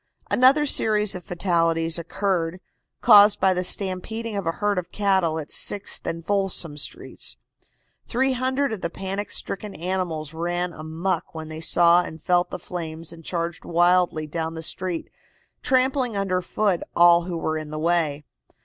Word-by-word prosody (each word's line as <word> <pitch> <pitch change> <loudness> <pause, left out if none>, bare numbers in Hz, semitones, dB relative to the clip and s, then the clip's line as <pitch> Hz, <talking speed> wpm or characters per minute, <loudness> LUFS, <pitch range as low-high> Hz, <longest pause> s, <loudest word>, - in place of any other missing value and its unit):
Another 270 +4 +5
series 210 -6 +2
of 180 - -6
fatalities 165 -2 +1
occurred, 180 0 -2 0.4
caused 210 -2 +7
by 190 0 +3
the 180 0 -1
stampeding 205 +5 0
of 200 -4 -3
a 165 - +1
herd 205 -1 0
of 175 - -9
cattle 190 -6 +1
at 155 -1 -6
Sixth 205 -1 0
and 165 0 -4
Folsom 195 -6 -1
Streets. 65 - -4 0.7
Three 265 +3 +1
hundred 260 0 0
of 205 - -6
the 170 - -2
panic 195 +3 -4
stricken 200 +1 -3
animals 170 -3 -3
ran 175 +2 -2
amuck 160 +4 -3
when 160 -1 -7
they 155 0 -7
saw 170 +1 +4
and 160 -2 -8
felt 175 +2 +1
the - - -5
flames 165 -2 -6
and 165 0 -13
charged 170 0 -3
wildly 175 -2 +2
down 160 +1 -4
the 160 - -6
street, 180 +1 0 0.5
trampling 260 -3 +1
under 185 -2 0
foot 195 0 0
all 170 0 +6
who 175 -2 -4
were 160 -1 -2
in 155 -1 -5
the 155 - -5
way. 155 -3 0
175 Hz, 160 wpm, -24 LUFS, 165-200 Hz, 0.7 s, caused